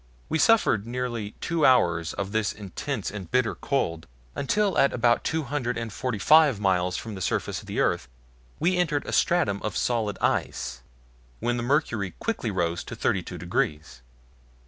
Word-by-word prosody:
We 160 - 0
suffered 155 - +4
nearly 120 -4 -3
two 170 -3 -1
hours 85 - +4
of 100 0 -4
this 110 -1 0
intense 105 +4 -4
and 95 -4 -7
bitter 120 -2 +2
cold, 85 - -2 0.3
until 205 +8 0
at 140 - +4
about 120 -1 +2
two 160 0 -1
hundred 130 -3 -2
and 115 -3 -4
forty 125 -1 -2
five 150 +1 +5
miles 90 -2 +1
from 110 - -6
the 95 - -7
surface - - -1
of - - -16
the - - -3
earth - - +1 0.5
we 180 +4 +2
entered 155 -5 0
a - - -5
stratum 110 - +2
of 110 - -3
solid 110 -5 0
ice, 60 - -1 0.6
when 120 +1 0
the - - -2
mercury 120 - 0
quickly 225 - -2
rose 85 -3 -1
to - - -7
32 90 -1 -1
degrees. 75 -6 -2
115 Hz, 170 wpm, -26 LUFS, 95-140 Hz, 0.6 s, five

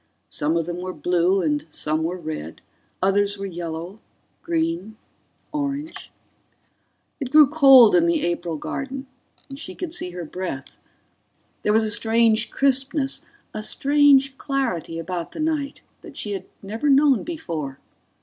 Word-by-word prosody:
Some 155 +3 0
of 165 - -1
them 175 +1 -4
were 185 +1 -5
blue 180 +2 +1
and 150 -1 -1
some 155 +1 -2
were 170 +3 -2
red, 155 - -7 0.4
others 200 +1 +2
were 200 - -5
yellow... 170 +2 -6 0.4
green... 170 +6 -2 0.5
orange... 290 +1 -4 1.1
It 270 -4 -4
grew 300 +2 +8
cold 270 -5 +7
in 170 -1 +4
the 170 - +1
April 170 -1 -2
garden 270 - -5 0.4
and 275 0 -9
she - - -6
could 355 -3 -5
see 265 - -3
her 175 -1 -6
breath. 160 -5 -6 0.9
There 210 - +1
was 220 +1 +4
a 215 - 0
strange 225 0 +3
crispness, 270 +1 +1 0.3
a 215 - -4
strange 275 +2 +3
clarity 235 - -2
about 170 +1 -5
the - - -8
night, 310 -3 -2 0.2
that 325 -7 -12
she 210 - -3
had 195 - -4 0.2
never 220 +9 -2
known 275 -3 +5
before 165 - -5
205 Hz, 145 wpm, -23 LUFS, 170-275 Hz, 1.1 s, grew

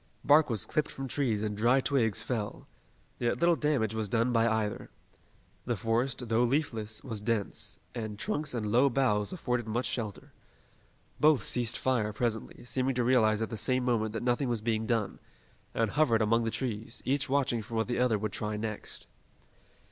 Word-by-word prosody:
Bark 150 +1 +5
was 110 -6 -1
clipped 155 - -1
from 135 0 -6
trees 120 -6 0
and 105 -1 -2
dry 120 +5 +4
twigs 125 -6 +1
fell. 105 -5 -3 0.5
Yet 120 -1 0
little 170 0 +4
damage 140 -9 0
was 110 -2 -3
done 115 +3 +2
by 115 0 +3
either. 110 -2 -1 0.8
The 120 - 0
forest, 115 +5 0
although 115 0 +1
leafless, 115 -5 0
was 115 -6 -5
dense, 110 -2 -2
and 110 -3 -5
trunks 155 - -2
and 105 -3 -2
low 125 +5 +5
boughs 110 -6 +1
afforded 125 -10 -2
much 120 +3 -1
shelter. 110 -5 -4 0.9
Both 150 -3 +5
ceased 120 -1 +1
fire 115 -5 0
presently, 115 0 -3
seeming 130 +1 0
to 125 - +1
realize 115 -3 +3
at 110 - -5
the 110 - -3
same 125 +4 +1
moment 110 -3 +1
that 115 - -3
nothing 125 +2 +1
was 120 -2 0
being 110 0 -1
done, 115 -4 -1 0.6
and 115 -3 +1
hovered 120 -7 +3
among 115 +2 +2
the - - +1
trees, 115 -2 -4
each 135 0 0
watching 135 -4 +1
for 110 +2 -8
what 110 0 0
the 120 - -1
other 125 -3 +3
would 105 0 -3
try 105 +2 -3
next. 110 -1 -5
115 Hz, 180 wpm, -30 LUFS, 110-130 Hz, 0.9 s, Bark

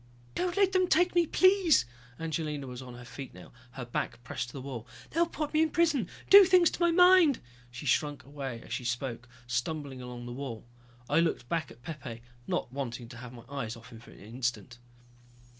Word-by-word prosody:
"Don't 360 +1 -1
let 395 -1 +4
them 370 -1 +3
take 355 +1 +3
me, 345 -2 +3
please!" 370 - +5 0.3
Angelina 155 -3 -3
was 125 0 -7
on 125 -1 -10
her 125 0 -11
feet 135 +1 -9
now, - - -13 0.2
her 130 -2 -6
back 120 0 -4
pressed 120 - -4
to - - -12
the 135 - -6
wall. 125 -3 -7 0.2
"They'll 335 +2 +2
put 305 -2 -4
me 310 - +4
in 320 - +3
prison, 300 - +2 0.2
do 400 0 +10
things 365 -2 +5
to - - -6
my 345 - +5
mind!" 360 -4 +6 0.3
She 120 +4 -9
shrunk 145 +1 +1
away 135 -3 -6
as - - -7
she - - -3
spoke, 120 0 -3 0.2
stumbling 130 +2 -3
along 125 -1 -8
the 120 - -6
wall. 125 -4 -6 0.4
I 150 - +3
looked 165 -7 0
back 165 -2 -1
at 120 - -16
Pepe, 135 -8 -7 0.2
not 120 - -2
wanting 120 -4 -5
to 120 - -10
have 120 0 -9
my 120 -2 -12
eyes 130 -5 -4
off 115 +1 -14
him 115 - -11
for 115 - -16
an - - -15
instant. 120 +1 -4
135 Hz, 210 wpm, -30 LUFS, -, 0.4 s, do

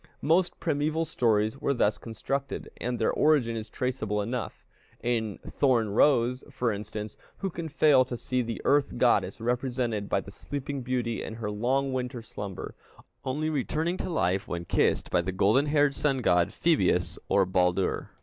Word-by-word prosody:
Most 175 +4 +2
primeval 155 +1 0
stories 115 -5 +1
were 140 - +1
thus 105 -3 +1
constructed, 135 +5 -4
and 125 0 -2
their 110 - +1
origin 140 -7 +3
is 110 -1 -5
traceable 110 -5 -2
enough. 115 +4 -4 0.4
In 110 -4 -1
Thorn 120 -6 +2
rose, 125 +2 +3
for 125 -4 -1
instance, 105 0 -6 0.2
who 195 -2 -3
can 165 -1 -5
fail 145 -3 +5
to 120 -1 -5
see 125 +2 -1
the 115 -1 -4
earth 145 -1 +2
goddess 100 -6 +2
represented 120 -3 -1
by 95 - +1
the 100 - -11
sleeping 140 +4 -5
beauty 120 -2 -2
in 110 - -6
her 110 -2 -4
long 130 +6 0
winter 125 -2 -3
slumber, 100 -4 -7 0.5
only 150 +4 -1
returning 155 +5 -1
to - - -4
life 95 - 0
when 85 0 -4
kissed - - +1
by - - +3
the 95 - -3
golden 105 +10 +3
haired 145 -1 +3
sun 135 -3 0
god 90 -3 +3
Phœbus - - +1
or 100 - +4
Baldur? 90 0 +1
125 Hz, 165 wpm, -28 LUFS, 105-140 Hz, 0.5 s, fail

